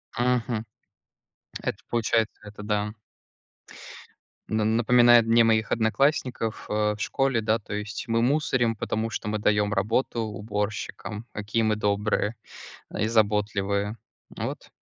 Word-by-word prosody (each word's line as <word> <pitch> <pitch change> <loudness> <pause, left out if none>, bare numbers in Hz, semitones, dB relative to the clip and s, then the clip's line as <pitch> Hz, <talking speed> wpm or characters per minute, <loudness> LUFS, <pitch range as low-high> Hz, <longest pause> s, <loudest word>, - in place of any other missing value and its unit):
Мгм. 120 -2 0 1.0
Это - - -2
получается, 115 -1 +1
это 105 0 -10
да. 105 0 -1 1.6
На 110 0 +1
напоминает 120 +1 +5
мне 115 +1 +5
моих 110 -1 +2
одноклассников, 120 0 0
а, 105 0 +1
в 105 - -9
школе, 135 -3 +1
да, 110 +1 +1
то 100 - -9
есть 105 +5 -5
мы 115 0 +1
мусорим, 125 -3 +2
потому 110 +2 -2
что 110 - -5
мы 105 0 -1
даём 105 0 +2
работу 115 +4 0
уборщикам, 105 0 -4
какие 105 +2 -1
мы 110 -1 +2
добрые, 105 +1 0 0.5
а, - - -5
и 110 - +1
заботливые. 105 -1 +1 0.4
Вот - - -5
110 Hz, 125 wpm, -26 LUFS, 105-115 Hz, 1.6 s, напоминает